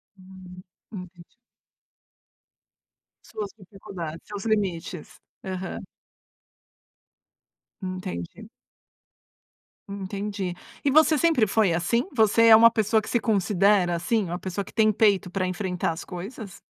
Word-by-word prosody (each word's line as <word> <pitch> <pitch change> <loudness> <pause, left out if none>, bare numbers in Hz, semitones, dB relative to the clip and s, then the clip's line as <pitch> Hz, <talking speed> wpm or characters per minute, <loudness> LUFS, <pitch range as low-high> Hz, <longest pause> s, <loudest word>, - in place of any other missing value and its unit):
Hum, 185 -1 -13 0.3
entendi. 180 -4 -10 2.0
Suas 210 -2 -6
dificuldades, 185 -5 -8
seus 205 -1 -7
limites. 190 -6 -2 0.2
Aham. 190 0 -5 2.0
Entendi. 185 - -6 1.4
Entendi. 200 -1 -4 0.3
E 280 - +2
você 315 +1 +5
sempre 295 -8 +3
foi 205 -2 +2
assim? 210 - 0
Você 230 0 +4
é 225 - +10
uma 230 +1 +8
pessoa 220 -1 +1
que - - -9
se 235 - +1
considera, 195 -3 +2
assim, 205 +5 0
uma 175 0 -4
pessoa 190 +2 -4
que - - -14
tem 215 -1 +4
peito 200 -3 +2
para 185 0 -1
enfrentar 180 -2 -2
as 165 - -6
coisas? 195 +2 -8
195 Hz, 110 wpm, -25 LUFS, 180-220 Hz, 2.0 s, é